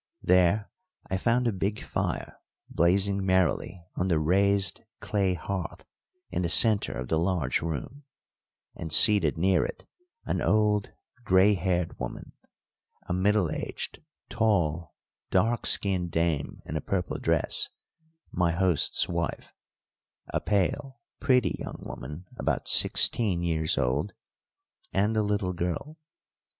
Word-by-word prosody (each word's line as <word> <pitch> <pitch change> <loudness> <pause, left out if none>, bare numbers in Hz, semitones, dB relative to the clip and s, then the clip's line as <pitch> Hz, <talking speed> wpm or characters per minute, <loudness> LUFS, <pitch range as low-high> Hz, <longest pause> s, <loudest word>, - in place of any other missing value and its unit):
There 90 +3 +2 0.4
I 95 - +1
found 120 +4 +1
a - - +2
big 100 +2 -3
fire - - -4 0.3
blazing 95 +3 +1
merrily 95 -1 0
on 90 - -1
the 85 -4 +1
raised 95 +4 +2 0.2
clay 95 -3 -1
hearth 90 +1 -6 0.5
in 90 -1 -2
the 85 - -1
centre 105 - +5
of 65 -1 -5
the 80 - +1
large 85 -7 0
room, 85 - -6 0.7
and 80 - -7
seated 100 - +5
near 95 +2 +2
it - - -7 0.4
an - - -2
old 105 -1 +1 0.3
grey 95 0 +4
haired 90 -2 -2
woman, - - -7 0.7
a - - -4
middle 95 -1 +1
aged, - - -5 0.3
tall, 85 -8 -1 0.3
dark 115 +1 +1
skinned 95 -3 +3
dame 85 -3 -2
in 80 - -6
a 75 - -2
purple 90 +2 -3
dress - - +3 0.6
my 85 -2 0
host's 90 -3 +1
wife; - - -4 0.8
a - - -1
pale, 130 - -1 0.2
pretty 125 -2 +1
young - - -7
woman, 75 +5 -9
about - - -2
sixteen 95 -7 +3
years 80 -2 0
old, 65 +8 -1 0.8
and 105 +3 0
a 110 - +2
little 100 -3 -1
girl. 90 - -4
95 Hz, 125 wpm, -27 LUFS, 85-105 Hz, 0.8 s, centre